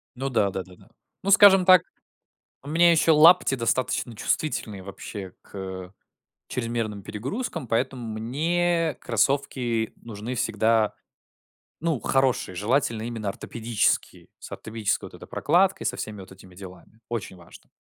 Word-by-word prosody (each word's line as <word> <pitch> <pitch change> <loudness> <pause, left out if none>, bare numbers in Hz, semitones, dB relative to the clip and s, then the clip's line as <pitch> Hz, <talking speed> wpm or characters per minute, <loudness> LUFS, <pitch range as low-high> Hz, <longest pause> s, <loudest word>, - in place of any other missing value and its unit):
Ну 135 +2 -3
да, 110 -5 +2
да-да-да. 95 +2 -8 0.3
Ну, 200 - 0
скажем 195 -2 +7
так, 185 -2 +8 0.8
у 140 - -11
меня 170 +2 +5
еще 165 0 +4
лапти 160 -1 +6
достаточно 125 0 -1
чувствительные, 105 -5 -2
вообще 100 0 -8
к 95 -1 -8 0.5
чрезмерным 115 -4 -3
перегрузкам, 130 - -5
поэтому 120 +2 -1
мне 160 +8 0
кроссовки 120 -2 0
нужны 115 +2 -7
всегда, 110 -1 +1 0.9
ну, 165 -4 -1
хорошие. 130 -8 0
Желательно 115 +3 0
именно 115 -3 -4
ортопедические, 115 +2 -1
с - - -11
ортопедической 110 -1 -3
вот - - -26
этой - - -12
прокладкой, 185 +5 +2
со - - -1
всеми 105 -2 -6
вот 95 - -13
этими 95 -1 -15
делами. 95 +3 -13
Очень 115 -5 -4
важно. 85 -1 -17
115 Hz, 130 wpm, -25 LUFS, 105-145 Hz, 0.9 s, так